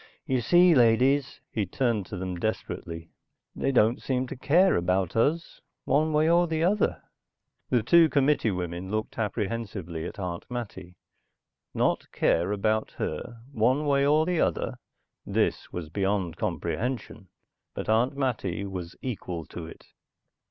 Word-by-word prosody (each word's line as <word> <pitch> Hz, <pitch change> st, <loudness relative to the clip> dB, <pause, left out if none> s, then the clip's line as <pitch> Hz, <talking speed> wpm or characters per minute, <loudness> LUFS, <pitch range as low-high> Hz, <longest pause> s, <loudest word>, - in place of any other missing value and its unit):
You 130 Hz, -2 st, 0 dB
see, 175 Hz, +8 st, +5 dB
ladies," 130 Hz, +2 st, +3 dB
he 105 Hz, -4 st, -1 dB
turned 115 Hz, -2 st, 0 dB
to 105 Hz, -, -6 dB
them 90 Hz, -1 st, -4 dB
desperately. 85 Hz, -5 st, -4 dB, 0.4 s
"They 135 Hz, -, 0 dB
don't 115 Hz, -2 st, +3 dB
seem 130 Hz, -1 st, -1 dB
to -, -, -5 dB
care 175 Hz, +9 st, +4 dB
about 90 Hz, +1 st, 0 dB
us, 155 Hz, +9 st, 0 dB, 0.2 s
one 155 Hz, +2 st, +2 dB
way 155 Hz, +1 st, +3 dB
or 175 Hz, +1 st, +4 dB
the 160 Hz, 0 st, -1 dB
other." 200 Hz, +4 st, +1 dB, 0.7 s
The 120 Hz, -3 st, +2 dB
two 165 Hz, +7 st, +6 dB
committee 140 Hz, -4 st, +2 dB
women 90 Hz, -1 st, -4 dB
looked 110 Hz, +2 st, -3 dB
apprehensively 100 Hz, -6 st, -3 dB
at -, -, -9 dB
Aunt 90 Hz, -3 st, -5 dB
Mattie. 110 Hz, -7 st, -6 dB, 0.8 s
Not -, -, +2 dB
to -, -, -25 dB
care 85 Hz, +4 st, +1 dB
about 110 Hz, +2 st, 0 dB
her, 120 Hz, -2 st, -4 dB
one 130 Hz, +5 st, +2 dB
way 140 Hz, -1 st, +3 dB
or 150 Hz, +2 st, +4 dB
the 175 Hz, -1 st, +1 dB
other? -, -, -1 dB, 0.4 s
This -, -, -1 dB
was 85 Hz, -3 st, -6 dB
beyond 95 Hz, -1 st, -1 dB
comprehension. 115 Hz, -5 st, -3 dB, 0.5 s
But -, -, -5 dB
Aunt 120 Hz, +6 st, +2 dB
Mattie 105 Hz, -9 st, -1 dB
was 90 Hz, -3 st, -6 dB
equal 90 Hz, -9 st, -4 dB
to 85 Hz, +1 st, -8 dB
it. -, -, -13 dB
115 Hz, 145 wpm, -27 LUFS, 95-140 Hz, 0.8 s, two